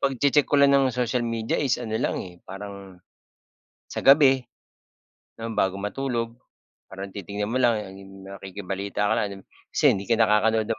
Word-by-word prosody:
pagche-check 140 +2 +2
ko 145 - +2
lang 140 0 +6
ng 135 -1 +4
social 125 0 0
media 115 -1 -1
is 135 -4 +1
ano 115 -3 -6
lang - - 0
eh, 90 -1 -13
parang, 100 -1 -9 0.9
sa - - -5
gabi, 135 -2 +6 0.9
bago 110 -4 -1
matulog, 115 +1 -2 0.6
parang 95 0 -8
titingnan 100 +2 -5
mo 130 - 0
lang 120 -2 +4
ano 95 -1 -10
yung 95 0 -13
nakikibalita 100 +1 -4
ka - - +3
lang 100 -2 -3 0.3
kasi - - +5
hindi 100 0 -2
ka 115 - +3
nakakanood 110 0 +3
ng 110 - -1
110 Hz, 160 wpm, -25 LUFS, 100-125 Hz, 0.9 s, lang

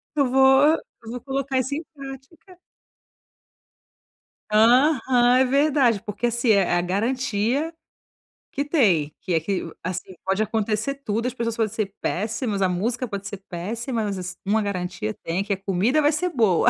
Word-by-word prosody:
Eu 280 -4 +2
vou 265 +4 +5 0.2
eu 225 - -11
vou 245 0 -6
colocar 270 0 -2
isso 260 +2 -2
em 300 - -2
prática. 275 +7 -11 1.9
Aham, 245 +7 +5 0.4
é 260 - +5
verdade. 270 -5 +2
Porque 210 +3 -3
assim, 240 0 +1
é - - +7
é - - -2
a 175 - +3
garantia 235 - -1 0.8
que 280 - -1
tem. 190 - +2
Que 185 - -2
é 165 - +3
que 185 +4 -2
o 165 - -9
assim. 185 +1 -5
Pode 195 +2 +1
acontecer 220 +4 -1
tudo 230 -4 -3
as 250 - -3
pessoas 230 -1 -2
podem 220 -3 0
ser 200 -3 -3
péssimas, 215 +1 -2
a 190 - +3
música 230 +8 -1
pode 200 -2 -5
ser 200 - -6
péssima, 225 +7 -3
mas 200 -2 -2
assi 185 0 -6
uma 215 +3 +2
garantia 180 - -3
tem, 175 +4 -1
que 200 0 -1
a - - -3
comida 200 +9 +1
vai 295 0 +4
ser 355 +4 0
boa. 220 - +3
225 Hz, 175 wpm, -23 LUFS, 195-270 Hz, 1.9 s, é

